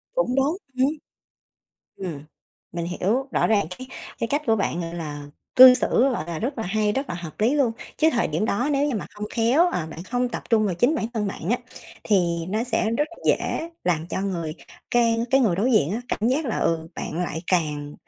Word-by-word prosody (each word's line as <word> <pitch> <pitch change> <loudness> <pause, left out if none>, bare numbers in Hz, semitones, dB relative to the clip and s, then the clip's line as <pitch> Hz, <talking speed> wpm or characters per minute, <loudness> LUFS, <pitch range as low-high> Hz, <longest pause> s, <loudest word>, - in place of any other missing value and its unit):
Cũng - - +1
đúng, 280 +6 +2 0.2
ừm. 260 +2 +4 1.1
Ừm, 175 -7 -5 0.5
mình 170 0 -3
hiểu, 210 +10 -1
rõ - - +2
ràng 210 -6 +2
cái 255 - -8 0.3
cái - - -1
cách 290 +4 0
của 225 -1 +3
bạn, 195 -3 -1
gọi 165 0 -5
là, 150 -4 -6 0.3
cư 255 0 +11
xử, - - 0 0.2
gọi 235 - -3
là, 170 -2 -4
rất 255 +4 -3
là 225 - -2
hay, 210 +2 +1
rất 270 +5 -2
là - - -3
hợp 170 0 -8
lý 235 +6 +3
luôn. 270 -6 +2 0.2
Chứ 315 - +4
thời 240 - +1
điểm 160 +6 -1
đó 240 +6 0
nếu 280 +1 +2
như 265 - -1
mà - - -4
không 210 0 -5
khéo, 250 +10 +4
ờ, 165 - -2
bạn 165 - -8
không 245 +5 -1
tập 240 - -5
trung 220 -2 +4
vào 185 - -1
chính 245 - +2
bản 260 - -1
thân 215 -2 0
bạn 195 -2 -4
á, 240 - +3 0.5
thì 170 -5 +1
nó 215 +4 -1
sẽ 225 -2 0
rất 295 +7 0 0.2
dễ 330 - 0
làm 165 -2 0
cho - - -2
người 170 -5 -3 0.4
cái 235 -1 +3
cái 270 - +5
người 210 -9 +2
đối 235 +7 +2
diện 170 -9 +3
á 225 - -2
cảm 220 - 0
giác 280 +4 +1
là, 225 - -1
ừ, 165 -1 0
bạn 170 +3 -3
lại 160 - -4
càng, 150 -5 -1
215 Hz, 225 wpm, -24 LUFS, 170-250 Hz, 1.1 s, cư